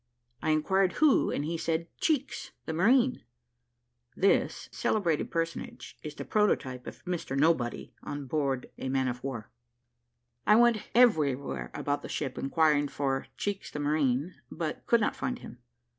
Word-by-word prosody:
I -, -, -1 dB
inquired 180 Hz, +5 st, +2 dB
who, 305 Hz, -3 st, +4 dB
and 145 Hz, -, -1 dB
he 165 Hz, +1 st, -2 dB
said, 165 Hz, 0 st, -1 dB
"Cheeks, 290 Hz, -4 st, -1 dB
the 160 Hz, -, -3 dB
marine." 245 Hz, +9 st, +3 dB, 0.9 s
[This 195 Hz, -, +2 dB
celebrated 170 Hz, -8 st, 0 dB
personage 165 Hz, 0 st, -4 dB
is 150 Hz, -1 st, -7 dB
the -, -, -6 dB
prototype 130 Hz, -12 st, 0 dB
of -, -, -10 dB
Mr 175 Hz, -6 st, -3 dB
Nobody 140 Hz, -5 st, +1 dB
on 145 Hz, -1 st, -5 dB
board 135 Hz, -2 st, 0 dB
of -, -, -21 dB
a 130 Hz, -, -3 dB
man 130 Hz, 0 st, +1 dB
of 125 Hz, 0 st, -4 dB
war.] 125 Hz, -6 st, -5 dB, 1.0 s
I 210 Hz, -, +7 dB
went 235 Hz, -1 st, +4 dB
everywhere 140 Hz, -, +3 dB
about 145 Hz, 0 st, -1 dB
the -, -, -8 dB
ship, 135 Hz, -3 st, -3 dB
inquiring 145 Hz, +1 st, +2 dB
for 135 Hz, -1 st, -2 dB
Cheeks 205 Hz, -1 st, -3 dB
the -, -, -7 dB
marine, 145 Hz, +1 st, +1 dB, 0.2 s
but 160 Hz, -2 st, -5 dB
could 235 Hz, -1 st, +4 dB
not -, -, +1 dB
find 255 Hz, -2 st, -2 dB
him. 120 Hz, -, -11 dB
155 Hz, 155 wpm, -29 LUFS, 135-195 Hz, 1.0 s, I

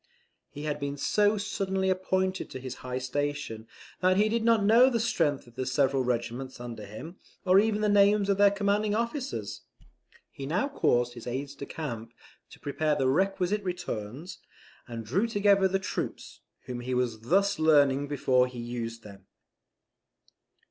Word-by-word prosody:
He 145 Hz, -, -8 dB
had 150 Hz, -1 st, -2 dB
been 140 Hz, 0 st, -3 dB
so 205 Hz, +7 st, +2 dB
suddenly 190 Hz, -1 st, -1 dB
appointed 185 Hz, 0 st, -1 dB
to 130 Hz, -, -7 dB
his 130 Hz, -1 st, -7 dB
high 125 Hz, 0 st, -4 dB
station, 130 Hz, -4 st, -3 dB, 0.3 s
that 185 Hz, 0 st, +3 dB
he 210 Hz, +2 st, +3 dB
did 230 Hz, +1 st, 0 dB
not 225 Hz, -2 st, +4 dB
know 235 Hz, +5 st, +6 dB
the 235 Hz, -3 st, 0 dB
strength 165 Hz, -, 0 dB
of 120 Hz, -, -17 dB
the 130 Hz, +2 st, -3 dB
several 135 Hz, 0 st, +2 dB
regiments 125 Hz, +1 st, -3 dB
under 115 Hz, -4 st, -7 dB
him, 160 Hz, -, -9 dB, 0.3 s
or 185 Hz, +1 st, +6 dB
even 215 Hz, 0 st, +1 dB
the 210 Hz, -, +2 dB
names 205 Hz, 0 st, +4 dB
of 200 Hz, -1 st, +2 dB
their 205 Hz, 0 st, +7 dB
commanding 205 Hz, +1 st, 0 dB
officers. 240 Hz, +4 st, -3 dB, 0.7 s
He 135 Hz, -3 st, -7 dB
now 180 Hz, -, 0 dB
caused 120 Hz, -, +1 dB
his 120 Hz, -1 st, -10 dB
aides 135 Hz, +3 st, -4 dB
de 140 Hz, 0 st, -8 dB
camp 115 Hz, -7 st, -6 dB, 0.4 s
to -, -, -15 dB
prepare 150 Hz, +1 st, 0 dB
the 130 Hz, -2 st, +1 dB
requisite 195 Hz, +5 st, +1 dB
returns, 160 Hz, -, -5 dB, 0.5 s
and 115 Hz, -2 st, -6 dB
drew 190 Hz, -, +1 dB
together 200 Hz, -3 st, +3 dB
the 190 Hz, +1 st, +1 dB
troops, 190 Hz, -, -5 dB, 0.3 s
whom 125 Hz, -1 st, -5 dB
he 125 Hz, +1 st, -3 dB
was 120 Hz, -3 st, -1 dB
thus 195 Hz, -, +1 dB
learning 145 Hz, -3 st, +4 dB
before 130 Hz, -3 st, +2 dB
he 125 Hz, -1 st, -10 dB
used 115 Hz, -1 st, -5 dB
them. 100 Hz, -2 st, -13 dB
150 Hz, 165 wpm, -28 LUFS, 125-200 Hz, 0.7 s, their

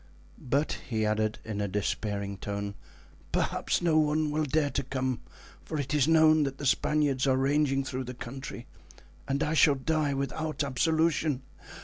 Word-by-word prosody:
But," 140 Hz, +4 st, -1 dB
he 110 Hz, -2 st, 0 dB
added 110 Hz, 0 st, 0 dB
in 105 Hz, -2 st, -3 dB
a 100 Hz, -, 0 dB
despairing 100 Hz, 0 st, -2 dB
tone, 100 Hz, +1 st, -4 dB, 0.6 s
"perhaps -, -, 0 dB
no 160 Hz, -2 st, +4 dB
one 155 Hz, 0 st, +1 dB
will 155 Hz, +1 st, 0 dB
dare 150 Hz, 0 st, +1 dB
to -, -, 0 dB
come 130 Hz, -1 st, -2 dB, 0.4 s
for 155 Hz, -, -4 dB
it 140 Hz, +1 st, -3 dB
is 150 Hz, -1 st, +3 dB
known 160 Hz, -1 st, +6 dB
that 135 Hz, -2 st, -1 dB
the 140 Hz, -, -6 dB
Spaniards 140 Hz, -1 st, +2 dB
are 130 Hz, -1 st, +3 dB
ranging 135 Hz, 0 st, +2 dB
through 130 Hz, 0 st, -4 dB
the 125 Hz, +1 st, -7 dB
country, 130 Hz, 0 st, -7 dB, 0.6 s
and 140 Hz, +1 st, 0 dB
I 150 Hz, -, 0 dB
shall 150 Hz, -2 st, +5 dB
die 145 Hz, +1 st, 0 dB
without 150 Hz, +3 st, -2 dB
absolution. 155 Hz, 0 st, +1 dB
140 Hz, 160 wpm, -29 LUFS, 125-155 Hz, 0.6 s, known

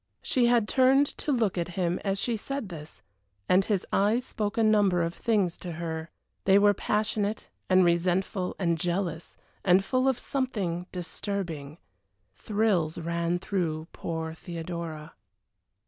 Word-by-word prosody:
She 245 Hz, -2 st, +2 dB
had 235 Hz, -3 st, +3 dB
turned 265 Hz, +3 st, +5 dB
to 300 Hz, -, -1 dB
look 220 Hz, -8 st, +1 dB
at 170 Hz, 0 st, -4 dB
him 175 Hz, -1 st, 0 dB
as 195 Hz, -1 st, 0 dB
she 235 Hz, +2 st, 0 dB
said 255 Hz, 0 st, -4 dB
this, 150 Hz, -, -10 dB, 0.4 s
and 185 Hz, +1 st, +5 dB
his 200 Hz, -2 st, 0 dB
eyes 215 Hz, +6 st, +2 dB
spoke 210 Hz, -3 st, -3 dB
a 225 Hz, -, +3 dB
number 205 Hz, -5 st, +4 dB
of 165 Hz, 0 st, -2 dB
things 200 Hz, -6 st, 0 dB
to 175 Hz, -2 st, -6 dB
her. 160 Hz, 0 st, -4 dB, 0.4 s
They 195 Hz, 0 st, +6 dB
were 205 Hz, 0 st, +5 dB
passionate, 210 Hz, +1 st, -1 dB, 0.2 s
and 185 Hz, -1 st, +6 dB
resentful, 180 Hz, +2 st, +1 dB
and 170 Hz, -3 st, 0 dB
jealous, 175 Hz, -1 st, -2 dB, 0.3 s
and 190 Hz, +1 st, +4 dB
full 255 Hz, +4 st, +1 dB
of 265 Hz, -3 st, +2 dB
something 200 Hz, -12 st, -2 dB
disturbing. 175 Hz, -5 st, -5 dB, 0.6 s
Thrills 190 Hz, -, 0 dB
ran 170 Hz, +1 st, -1 dB
through 165 Hz, -4 st, -2 dB
poor 160 Hz, -1 st, -4 dB
Theodora. 165 Hz, -2 st, -6 dB
185 Hz, 145 wpm, -28 LUFS, 170-210 Hz, 0.6 s, They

